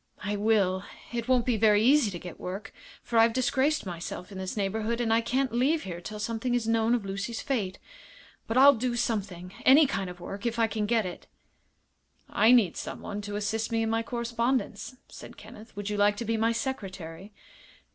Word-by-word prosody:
"I 205 +1 -1
will. 200 -3 +2 0.3
It 235 -1 -3
won't 255 -2 +3
be 245 -3 +1
very 210 0 +4
easy 270 -2 +5
to 180 - -6
get 175 -1 -10
work, 190 +4 -6 0.3
for 230 - +1
I've 225 0 +5
disgraced 265 +3 +1
myself 180 +2 -6
in 190 - -7
this 190 +2 -5
neighborhood, 220 +4 -1
and 230 -2 +1
I 225 - +3
can't 255 +2 -1
leave 280 +7 +2
here 175 -2 -6
till 210 +4 -7
something 230 +3 -2
is 235 -2 -1
known 225 +1 +2
of 225 -5 -3
Lucy's 195 +4 -4
fate. 205 -9 -2 0.7
But 225 - -1
I'll 280 +2 +9
do 245 0 -2
something 200 -7 -3
any 285 +4 +7
kind 195 -9 -2
of 180 0 -10
work 200 +6 -5
if 235 0 -2
I 230 - +4
can 215 -1 -2
get 225 -2 +2
it." 180 - -7 1.0
"I 220 +3 +4
need 225 -9 +4
someone 205 0 -5
to 205 0 -6
assist 220 +2 -2
me 225 0 +1
in 225 - -1
my 225 0 +1
correspondence," 235 +3 -2
said - - -12
Kenneth. 220 +2 -13
"Would 205 0 -4
you 210 - -2
like 205 0 +3
to 235 - -4
be 225 +1 0
my 225 +1 +2
secretary?" 195 - -5
225 Hz, 200 wpm, -28 LUFS, 200-240 Hz, 1.0 s, I'll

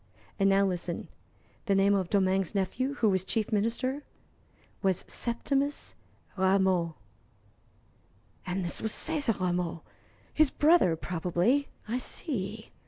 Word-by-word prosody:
"And 195 0 +4
now 195 0 +4
listen. 175 -2 -3 0.6
The 200 - +3
name 195 +1 +4
of 190 -3 0
Domingue's 190 -1 +1
nephew, 255 +8 -1
who 225 -6 +2
was 190 -2 +1
Chief 215 +3 -1
Minister, 235 +6 0 0.8
was 190 -3 +1
Septimus 275 +4 -1 0.4
Rameau." 190 -3 +2 1.5
"And 185 +1 -1
this 170 - -3
was 220 - -1
César 290 -10 0
Rameau 175 -2 -1 0.5
his 310 -2 +4
brother, 300 - +4
probably. 180 - 0 0.2
I 240 +4 -1
see. 220 - -4
195 Hz, 115 wpm, -29 LUFS, 185-245 Hz, 1.5 s, And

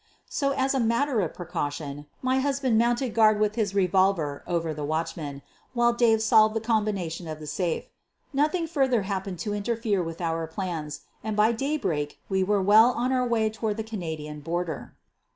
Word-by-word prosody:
So, 280 -1 0
as 270 0 +1
a 270 - +1
matter 235 +1 +2
of 170 - -3
precaution, 145 -4 -4 0.2
my 260 +1 +2
husband 270 -3 +1
mounted 240 +2 +2
guard 215 -2 +5
with 210 0 +2
his 210 -3 -1
revolver 185 -6 +2
over 165 -2 -1
the 150 0 -5
watch 160 +2 -1
man, 145 -4 -6 0.3
while 240 0 +4
Dave 225 -2 +3
solved 215 0 +5
the - - +2
combination 205 -7 -1
of 155 -1 -5
the 155 - -9
safe. 170 +2 -1 0.5
Nothing 305 +5 +1
further 265 -9 +1
happened 190 -1 -3
to 210 - -1
interfere 210 -1 0
with 165 -1 -5
our 165 -1 -1
plans 160 -4 -4 0.2
and 215 -1 -3
by 215 +2 +5
daybreak 220 - -2
we 190 -1 +2
were 200 0 +1
well 215 +5 +7
on 250 +2 0
our 255 -1 +1
way 225 -2 +2
to 215 - -16
ward 215 -1 0
the 220 - -2
Canadian 160 -8 -5
border. 165 +1 -4
205 Hz, 185 wpm, -26 LUFS, 165-235 Hz, 0.5 s, well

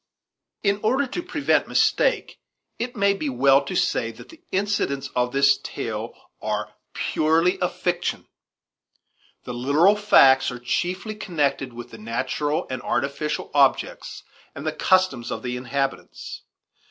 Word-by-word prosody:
In 200 0 +2
order 260 +6 +2
to 310 +7 -4
prevent 330 -5 +1
mistake, - - +1 0.4
it 245 +1 -3
may 200 -2 +3
be 155 -7 -3
well 135 +2 +4
to - - -5
say 115 - +1
that - - -14
the 325 0 -15
incidents 165 -9 -1
of 125 0 +1
this 140 +1 +4
tale 110 0 -5 0.3
are - - -3 0.2
purely 165 +4 +1
a 180 - +1
fiction. 175 0 -2 1.2
The 125 - -6
literal 145 +11 +3
facts 135 -11 +5
are 125 - -6
chiefly 180 - -2
connected 145 -10 -1
with 120 0 -10
the 115 - -11
natural 130 +7 -2
and 130 - -3
artificial 145 +2 -2
objects 140 -2 +1 0.3
and - - -7
the - - 0
customs 185 -11 +2
of - - -5
the 125 -1 -3
inhabitants. 140 - -4
145 Hz, 140 wpm, -23 LUFS, 130-200 Hz, 1.2 s, facts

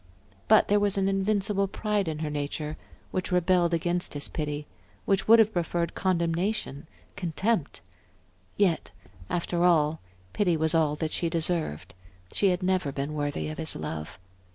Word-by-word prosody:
But 215 - +6
there 205 0 +4
was 205 -1 +1
an 195 0 +2
invincible 195 0 +1
pride 205 -1 -1
in 155 -1 -2
her - - -2
nature 150 +1 -3 0.4
which 185 0 -2
rebelled 180 -1 +3
against 175 0 -1
his 145 - -2
pity, 150 -1 -4 0.4
which 195 -1 +1
would 225 +1 +8
have 220 -1 +4
preferred 170 -1 -1
condemnation, 170 -3 -1 0.3
contempt. 185 0 -1 0.8
Yet, 190 -5 +2 0.4
after 175 0 -1
all, 160 -3 +3 0.3
pity 180 -5 +2
was 160 +1 +2
all 155 -3 +2
that 155 +1 -3
she 170 - -1
deserved; 160 - -2 0.4
she 200 - +2
had 180 0 0
never 185 -5 +1
been 140 +2 -3
worthy 145 -1 -2
of 155 - -7
his 160 -1 -1
love. 75 +1 -5
170 Hz, 155 wpm, -27 LUFS, 155-195 Hz, 0.8 s, would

